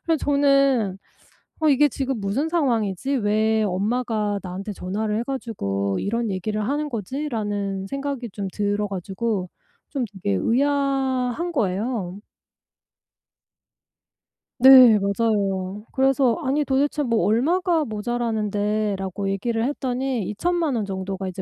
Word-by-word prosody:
그래서 330 Hz, -1 st, +2 dB
저는 275 Hz, -8 st, +3 dB, 0.6 s
'어 315 Hz, -, +3 dB
이게 295 Hz, +1 st, +5 dB
지금 265 Hz, -3 st, -3 dB
무슨 225 Hz, +11 st, -1 dB
상황이지? 255 Hz, -, 0 dB
왜 220 Hz, 0 st, +2 dB
엄마가 210 Hz, +1 st, -1 dB
나한테 190 Hz, +3 st, -5 dB
전화를 210 Hz, +3 st, -2 dB
해 -, -, 0 dB
가지고 100 Hz, -, -2 dB
이런 230 Hz, +2 st, -1 dB
얘기를 210 Hz, +3 st, -2 dB
하는 295 Hz, +2 st, -1 dB
거지?'라는 205 Hz, -5 st, -3 dB
생각이 275 Hz, -3 st, -4 dB
좀 195 Hz, -1 st, -4 dB
들어 205 Hz, 0 st, -1 dB
가지고 195 Hz, 0 st, -3 dB, 0.4 s
좀 275 Hz, -4 st, -1 dB
되게 185 Hz, -, -2 dB
의아한 270 Hz, -, 0 dB
거예요. 200 Hz, -, -1 dB, 2.4 s
네. 255 Hz, -4 st, +9 dB
맞아요. 200 Hz, -1 st, -1 dB
그래서 265 Hz, -2 st, +3 dB
"아니 285 Hz, +2 st, +1 dB
도대체 285 Hz, +2 st, +1 dB
뭐 230 Hz, -7 st, +1 dB
얼마가 320 Hz, -, +2 dB
모자라는데." 215 Hz, -2 st, -1 dB
라고 195 Hz, +1 st, -3 dB
얘기를 225 Hz, +4 st, -1 dB
했더니 260 Hz, -3 st, -1 dB
20,000,000 330 Hz, -, 0 dB
원 225 Hz, -, 0 dB
정도가 190 Hz, -1 st, -4 dB
이제 185 Hz, +1 st, -6 dB
225 Hz, 265 characters per minute, -23 LUFS, 200-270 Hz, 2.4 s, 네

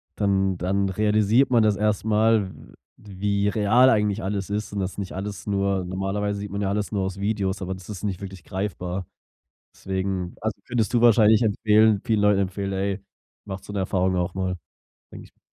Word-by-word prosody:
dann 95 Hz, -2 st, +1 dB
dann 95 Hz, +2 st, 0 dB
realisiert 105 Hz, +6 st, +3 dB
man 120 Hz, -3 st, +4 dB
das 105 Hz, -1 st, +3 dB
erst 105 Hz, 0 st, 0 dB
mal, 110 Hz, -2 st, +3 dB
w -, -, -16 dB, 0.2 s
wie 100 Hz, 0 st, -2 dB
real 115 Hz, +5 st, +4 dB
eigentlich 105 Hz, -2 st, +1 dB
alles 100 Hz, 0 st, -3 dB
ist 105 Hz, +1 st, -3 dB
und 100 Hz, -, -3 dB
das 95 Hz, +1 st, -3 dB
nicht 100 Hz, -2 st, -5 dB
alles 100 Hz, +2 st, -6 dB
nur 100 Hz, -2 st, 0 dB
normalerweise 95 Hz, +2 st, -2 dB
sieht 100 Hz, 0 st, -5 dB
man 100 Hz, +1 st, -3 dB
ja 95 Hz, -, 0 dB
alles 105 Hz, 0 st, -2 dB
nur 100 Hz, -, 0 dB
aus 95 Hz, 0 st, -4 dB
Videos, 100 Hz, -2 st, -1 dB
aber 95 Hz, +1 st, -3 dB
das 95 Hz, 0 st, -13 dB
ist 105 Hz, -2 st, -7 dB
nicht 100 Hz, -2 st, -3 dB
wirklich 95 Hz, -1 st, -8 dB
greifbar. 95 Hz, -2 st, -4 dB, 0.7 s
Deswegen 95 Hz, -1 st, -3 dB
also 110 Hz, -2 st, -3 dB
findest 120 Hz, -2 st, -1 dB
du 120 Hz, -, +3 dB
wahrscheinlich 110 Hz, -1 st, +5 dB
empfehlen 110 Hz, 0 st, +3 dB
vielen 110 Hz, -2 st, +1 dB
Leuten 105 Hz, -1 st, +4 dB
empfehlen: 95 Hz, +1 st, -2 dB
„Ey, 95 Hz, +1 st, -2 dB, 0.4 s
macht 95 Hz, -2 st, -7 dB
so 105 Hz, -, -9 dB
‘ne 100 Hz, -, -3 dB
Erfahrung 95 Hz, 0 st, 0 dB
auch 90 Hz, +1 st, -1 dB
mal“, 95 Hz, -1 st, -2 dB, 0.6 s
denke -, -, -10 dB
ich -, -, -20 dB
m -, -, -43 dB
100 Hz, 195 wpm, -24 LUFS, 95-105 Hz, 0.7 s, wahrscheinlich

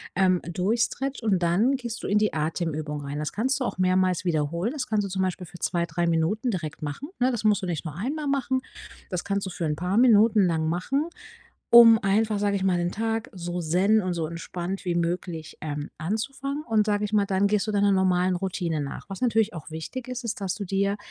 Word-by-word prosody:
ähm, 185 Hz, -1 st, +3 dB
durchstretcht 230 Hz, +9 st, -1 dB
und 205 Hz, -5 st, +2 dB
dann 205 Hz, +11 st, +3 dB
gehst 240 Hz, -3 st, -5 dB
du -, -, -4 dB
in 205 Hz, -, +2 dB
die 215 Hz, 0 st, +2 dB
Atemübung 155 Hz, -1 st, -2 dB
rein. 140 Hz, +1 st, -5 dB
Das 150 Hz, -, -3 dB
kannst 265 Hz, +6 st, 0 dB
du 260 Hz, -, -1 dB
auch -, -, -3 dB
mehrmals 185 Hz, 0 st, +2 dB
wiederholen. 170 Hz, +5 st, 0 dB
Das 290 Hz, -2 st, -4 dB
kannst 215 Hz, -1 st, +1 dB
du -, -, -5 dB
zum 190 Hz, 0 st, -2 dB
Beispiel 185 Hz, 0 st, -2 dB
für 175 Hz, -, -12 dB
2, 170 Hz, -1 st, 0 dB
3 170 Hz, +1 st, -1 dB
Minuten 170 Hz, +9 st, +1 dB
direkt 170 Hz, -8 st, -4 dB
machen, 150 Hz, -, -5 dB
ne? 255 Hz, +1 st, +3 dB
Das 225 Hz, -3 st, -3 dB
musst 210 Hz, -2 st, +3 dB
du -, -, -3 dB
nicht 170 Hz, -5 st, -3 dB
nur 155 Hz, -3 st, -6 dB
einmal 285 Hz, -, -3 dB
machen, 260 Hz, -2 st, 0 dB, 0.5 s
das 180 Hz, -2 st, -3 dB
kannst 200 Hz, 0 st, -1 dB
du -, -, -4 dB
für 175 Hz, -1 st, -3 dB
'n 150 Hz, -1 st, 0 dB
paar 180 Hz, +5 st, -1 dB
Minuten 220 Hz, -3 st, +5 dB
lang 160 Hz, -2 st, 0 dB
machen. 270 Hz, -, -1 dB, 0.6 s
um 230 Hz, -1 st, +9 dB
einfach, 210 Hz, +2 st, +2 dB
sage 200 Hz, 0 st, +1 dB
ich 190 Hz, -, -2 dB
mal, 185 Hz, -2 st, +2 dB
den 175 Hz, 0 st, -1 dB
Tag 225 Hz, +2 st, -2 dB
so 175 Hz, -1 st, -4 dB
zen 185 Hz, +7 st, +3 dB
und 185 Hz, -1 st, -1 dB
so 165 Hz, -2 st, -2 dB
entspannt 175 Hz, +3 st, -5 dB
wie 175 Hz, -, 0 dB
möglich, 170 Hz, -2 st, -3 dB
ähm, 145 Hz, -1 st, -4 dB
anzufangen 275 Hz, -, -3 dB
und, 220 Hz, -4 st, +2 dB
sage 210 Hz, 0 st, +1 dB
ich 210 Hz, -, -4 dB
mal, 205 Hz, -1 st, +3 dB
dann 195 Hz, +1 st, +2 dB
gehst 210 Hz, 0 st, +1 dB
du 215 Hz, -, -2 dB
deiner 200 Hz, -1 st, +3 dB
normalen 185 Hz, -1 st, +2 dB
Routine 175 Hz, -4 st, -2 dB
nach. 140 Hz, -, -5 dB
Was 195 Hz, -, -6 dB
natürlich 225 Hz, -3 st, +2 dB
auch 160 Hz, -3 st, -9 dB
wichtig 160 Hz, -, -6 dB
ist, 250 Hz, -1 st, -5 dB
ist, 220 Hz, -2 st, -3 dB
dass 190 Hz, -2 st, -1 dB
du 205 Hz, -, -5 dB
dir 200 Hz, +1 st, 0 dB
195 Hz, 225 wpm, -26 LUFS, 170-220 Hz, 0.6 s, um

